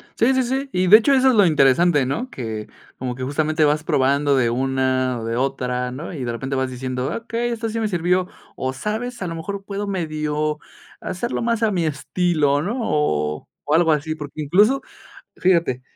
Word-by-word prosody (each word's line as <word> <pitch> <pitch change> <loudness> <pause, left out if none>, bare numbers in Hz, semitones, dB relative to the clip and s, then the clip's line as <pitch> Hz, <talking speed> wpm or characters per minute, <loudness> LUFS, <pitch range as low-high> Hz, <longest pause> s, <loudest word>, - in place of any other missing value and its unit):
Sí, 245 +4 +3
sí, 260 0 +2
sí. 265 +3 -2
Y 185 0 +1
de 210 +4 +10
hecho 255 +5 +2
eso 265 0 +5
es 255 - +3
lo 205 -3 +6
interesante, 150 -1 +4
¿no? 230 - -3
Que, 110 - -5 0.3
como 125 -1 -4
que 130 - -6
justamente 155 +4 0
vas 150 +1 +1
probando 140 0 +2
de 125 -3 +2
una, 130 0 0
o 115 - -6
de 115 0 -2
otra, 125 -1 -1
¿no? 150 +8 -7
Y 140 -6 -5
de 120 - -2
repente 135 +4 -4
vas 130 0 0
diciendo: 130 0 -3
"Okey, 230 +1 -3
esto 230 -1 -3
sí 225 +1 -3
me 220 - 0
sirvió. 180 -1 +1 0.3
O 130 0 -3
sabes, 220 - -4
a 180 - -2
lo 165 - -4
mejor 195 +5 -5
puedo 200 +1 -4
medio 155 -4 -2 0.4
hacerlo 235 +7 -3
más 230 -1 0
a 220 - +3
mi 175 -4 0
estilo, 150 -1 +1
¿no? 205 - -2
O 75 - -1 0.2
o 145 - -1
algo 165 0 +4
así". 155 +1 -1
Porque 150 0 -7
incluso, 205 - +3 0.5
fíjate, 170 -8 +1
155 Hz, 200 wpm, -21 LUFS, 130-200 Hz, 0.5 s, de